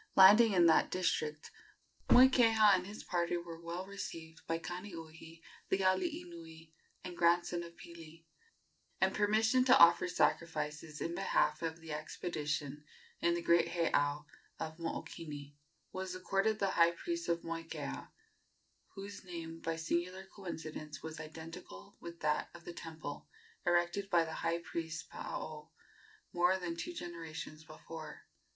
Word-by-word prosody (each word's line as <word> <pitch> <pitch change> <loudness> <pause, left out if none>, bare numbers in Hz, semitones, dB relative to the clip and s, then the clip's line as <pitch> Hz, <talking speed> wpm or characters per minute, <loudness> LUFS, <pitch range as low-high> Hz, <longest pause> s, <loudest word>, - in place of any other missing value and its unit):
Landing 205 +3 +9
in 175 -2 +5
that 165 - +5
district, 155 -4 -1 0.6
Moikeha 230 -5 +7
and 185 -1 +1
his 205 +2 -8
party 175 -1 0
were 170 -1 -8
well 170 +2 -5
received 165 -5 -7
by 165 - 0
Kaniuhi, 165 -2 -8 0.3
the 190 - +3
alii 300 - +1
nui 165 -1 -12 0.3
and 180 -1 -6
grandson 175 0 +3
of 170 0 -9
Pili, 165 -1 -12 0.7
and - - +3
permission 220 +4 +3
to 260 - +7
offer 170 +1 +7
sacrifices 155 -3 -1
in 170 - -2
behalf 195 -1 +1
of 165 0 -3
the 160 -1 -8
expedition 150 -2 -3 0.4
in 170 0 +2
the 170 - -3
great 170 0 +4
heiau 150 -3 +1 0.3
of 160 0 -5
Mookini 150 -3 -6 0.4
was 185 0 -4
accorded 195 +3 +1
the 195 -2 +1
high 170 0 +5
priest 340 - -4
of 170 0 0
Moikeha, 165 0 -5 0.9
whose 200 +1 -8
name, 165 -2 -7
by 165 0 -2
singular 175 +3 -2
coincidence, 155 -6 -7
was 160 0 -6
identical 160 - -9
with 170 0 -9
that 150 0 +1
of 170 - -13
the 175 - -6
temple, 160 -3 -7 0.4
erected 175 +3 +2
by 170 -3 +4
the 160 - -6
high 165 0 +1
priest 160 -2 -5
Paao 150 0 -6 0.6
more 175 +2 +3
than 175 -2 -4
two 345 - -4
generations 165 - -7
before. 155 0 -9
170 Hz, 140 wpm, -34 LUFS, 160-185 Hz, 0.9 s, Landing